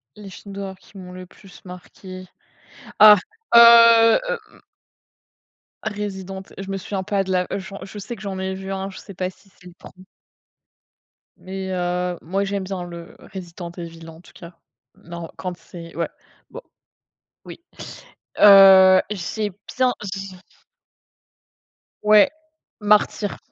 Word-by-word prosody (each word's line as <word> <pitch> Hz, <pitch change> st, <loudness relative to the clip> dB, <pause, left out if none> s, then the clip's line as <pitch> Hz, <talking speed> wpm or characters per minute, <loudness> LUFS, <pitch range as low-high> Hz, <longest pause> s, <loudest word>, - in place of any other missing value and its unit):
Les 210 Hz, -2 st, -11 dB
films 200 Hz, +1 st, -12 dB
d'horreur 195 Hz, -1 st, -7 dB
qui 200 Hz, -, -18 dB
m'ont 180 Hz, -1 st, -10 dB
le 185 Hz, 0 st, -10 dB
plus 185 Hz, +1 st, -18 dB
marqué. 185 Hz, +1 st, -11 dB, 0.7 s
Ah, 210 Hz, -1 st, +9 dB, 0.4 s
heu, 230 Hz, -1 st, +8 dB, 0.4 s
hem -, -, -22 dB, 1.2 s
Resident, 195 Hz, -3 st, -6 dB, 0.2 s
je 195 Hz, 0 st, -7 dB
me 195 Hz, -, -3 dB
souviens 195 Hz, +1 st, -5 dB
pas 195 Hz, 0 st, -1 dB
de 190 Hz, -, -6 dB
la 180 Hz, -1 st, 0 dB
je 195 Hz, +1 st, -9 dB
je 205 Hz, -, -11 dB
sais 210 Hz, +4 st, -7 dB
que -, -, -15 dB
j'en 195 Hz, -2 st, -5 dB
ai 190 Hz, 0 st, -3 dB
vu 190 Hz, 0 st, -7 dB
un, 195 Hz, 0 st, -4 dB
je -, -, -11 dB
sais 200 Hz, -, -13 dB
pas 185 Hz, +1 st, -3 dB
si 195 Hz, -, -26 dB
c'est 185 Hz, -, -24 dB
le 180 Hz, -, -13 dB
1er 185 Hz, +1 st, -16 dB, 1.3 s
mais, 190 Hz, 0 st, -7 dB
heu, 180 Hz, 0 st, -2 dB
moi, 190 Hz, +5 st, -2 dB
j'aime 200 Hz, 0 st, -3 dB
bien 185 Hz, -1 st, -5 dB
le 170 Hz, -1 st, -11 dB, 0.2 s
Resident 175 Hz, -2 st, -8 dB
Evil, 165 Hz, -1 st, -9 dB
en 160 Hz, +1 st, -14 dB
tout -, -, -20 dB
cas. 170 Hz, 0 st, -13 dB, 0.4 s
Non, 170 Hz, 0 st, -10 dB
quand 180 Hz, -1 st, -5 dB
c'est 170 Hz, -2 st, -12 dB
ouais, 170 Hz, -, -2 dB, 0.4 s
bon, -, -, -10 dB, 0.8 s
oui. -, -, -11 dB, 0.8 s
Heu, 190 Hz, -2 st, +8 dB
j'ai 210 Hz, +2 st, -4 dB, 0.3 s
bien 255 Hz, -1 st, +2 dB, 0.2 s
j'ai 195 Hz, -1 st, -8 dB, 1.7 s
Ouais, 210 Hz, -1 st, +5 dB, 0.5 s
Martyr. 210 Hz, -1 st, +1 dB
190 Hz, 145 wpm, -21 LUFS, 180-200 Hz, 1.7 s, Ah